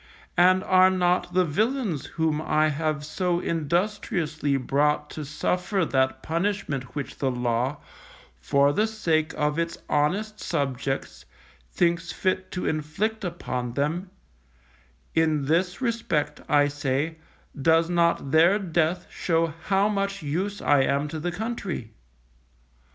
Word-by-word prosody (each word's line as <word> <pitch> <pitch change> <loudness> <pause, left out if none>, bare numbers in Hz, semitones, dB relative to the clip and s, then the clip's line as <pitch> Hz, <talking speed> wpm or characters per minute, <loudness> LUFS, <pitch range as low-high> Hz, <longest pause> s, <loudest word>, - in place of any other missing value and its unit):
And 185 +1 +5
are 185 0 +5
not 180 -1 +1
the 185 -1 +4
villains 210 - -1
whom 160 -2 -1
I 155 0 +2
have 150 0 -2
so 175 +2 0
industriously 170 -3 -1
brought 150 +3 +1
to 155 - -5
suffer 180 +6 -1
that 130 -2 0
punishment 160 -7 -2
which 145 - -5
the 135 - +1
Law, 125 +2 -1 0.6
for 140 - +3
the 215 +6 +2
sake 165 -8 0
of 150 +1 0
its 170 0 -2
honest 200 +9 0
subjects, 135 -4 -3 0.4
thinks 170 - 0
fit 185 0 -1
to 180 - -4
inflict 160 +9 -2
upon 125 -9 -3
them 165 +7 -1 1.0
in 155 -3 +2
this 175 - +1
respect, 170 - -1
I 145 -1 +5
say, 145 +2 -2 0.4
does 165 +2 +4
not 170 -5 +1
their 170 +6 +5
death 175 -2 0
show 165 -1 0
how 195 +1 +3
much 200 -3 -2
use 185 +8 -2
I 145 -2 +4
am 140 +2 +1
to 155 - -5
the 175 +3 -2
country? 195 - -4
160 Hz, 130 wpm, -25 LUFS, 145-185 Hz, 1.0 s, And